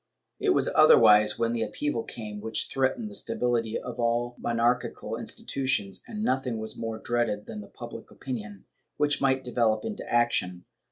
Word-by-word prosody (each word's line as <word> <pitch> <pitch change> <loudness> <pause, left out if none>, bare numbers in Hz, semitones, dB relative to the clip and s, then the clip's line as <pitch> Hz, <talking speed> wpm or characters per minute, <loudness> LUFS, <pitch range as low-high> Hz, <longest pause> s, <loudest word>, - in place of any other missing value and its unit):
It - - +1
was - - +3
otherwise 105 0 +7
when 115 0 0
the 115 - -1
upheaval 115 +4 -2
came 105 -3 -7
which 110 +1 0
threatened 135 - 0
the 210 - -9
stability 115 - -1
of 125 -1 -7
all 120 +1 0
monarchical 120 +1 0
institutions, 130 -8 -2
and 215 -1 -5
nothing 130 - 0
was 110 0 -2
more 115 -1 -4
dreaded 115 -2 -1
than 105 -1 -8
public - - -9
opinion, 105 -6 -7 0.3
which 145 -1 +1
might 135 -1 +2
develop 115 -3 +1
into 215 - -4
action. 90 -7 +1
120 Hz, 155 wpm, -27 LUFS, 110-130 Hz, 0.3 s, otherwise